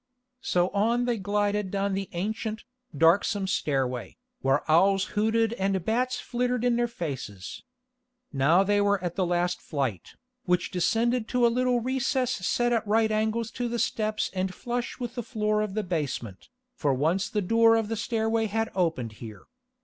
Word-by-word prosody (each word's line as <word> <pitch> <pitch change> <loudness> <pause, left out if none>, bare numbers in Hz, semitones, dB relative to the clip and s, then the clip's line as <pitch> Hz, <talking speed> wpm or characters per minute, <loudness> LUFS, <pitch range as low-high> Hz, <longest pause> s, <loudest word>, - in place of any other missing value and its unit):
So 180 0 +1
on 230 +5 +1
they 240 -3 0
glided 205 0 0
down 200 +1 -1
the 195 0 -3
ancient, 215 +4 -3 0.3
darksome 190 +5 +3
stairway, 130 - -1 0.2
where 135 +2 +2
owls 195 +5 +4
hooted 220 +2 +2
and 195 -4 -1
bats 250 +3 0
flittered 250 0 -1
in 245 -1 +3
their 240 0 +1
faces. 135 - -6 0.7
Now 155 +7 +4
they 205 +1 +2
were 200 -1 +2
at 175 -1 -3
the 185 -3 0
last 175 0 0
flight, 135 - -3 0.3
which 180 -1 +1
descended 225 +6 +1
to 250 -1 +2
a 235 - +3
little 250 -1 +1
recess 260 0 0
set 240 +4 0
at 225 -2 0
right 220 +1 +3
angles 220 +1 0
to 245 0 -3
the 235 0 -2
steps 215 -2 -1
and 185 0 -1
flush 245 0 -4
with 240 -1 -4
the 245 - -3
floor 215 -2 0
of 210 -2 -3
the 215 - 0
basement, 145 - -4 0.2
for 145 - 0
once 165 +8 0
the 210 -2 -1
door 225 +4 +5
of 225 -2 0
the 225 - -2
stairway 225 0 0
had 225 +2 -1
opened 165 - -1
here. 110 -3 -9
210 Hz, 170 wpm, -27 LUFS, 175-230 Hz, 0.7 s, door